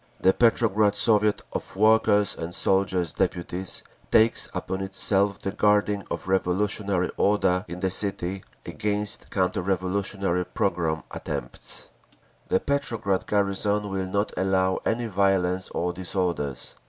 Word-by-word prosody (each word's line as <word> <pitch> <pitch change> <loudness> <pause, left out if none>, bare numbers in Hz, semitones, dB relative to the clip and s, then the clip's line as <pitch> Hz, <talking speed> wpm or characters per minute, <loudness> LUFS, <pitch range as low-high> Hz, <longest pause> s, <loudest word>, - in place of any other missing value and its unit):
The 95 - +4
Petrograd 110 -3 +3
Soviet 105 -1 +3
of - - -5
Workers' 105 -1 +4
and 85 +1 -4
Soldiers' 95 -3 +1
Deputies 90 0 -2 0.3
takes 110 +1 +4
upon 95 +1 -4
itself 95 +1 +1
the 95 - -4
guarding 105 -1 +2
of - - -4
revolutionary 95 0 0
order 95 -2 +2
in 90 +1 -7
the 95 -1 0
city 95 -1 -1 0.2
against 105 0 -1
counter 95 -2 0
revolutionary 95 0 -1
and 90 - -5
pogrom 80 -5 0
attempts. - - -5 0.6
The - - +3
Petrograd 115 -9 -1
garrison 100 +1 0
will 95 -1 -2
not 100 +3 -1
allow 95 0 +1
any 120 +1 0
violence 95 -3 +1
or 90 +1 -2
disorders. 90 -6 -3
95 Hz, 125 wpm, -25 LUFS, 90-105 Hz, 0.6 s, The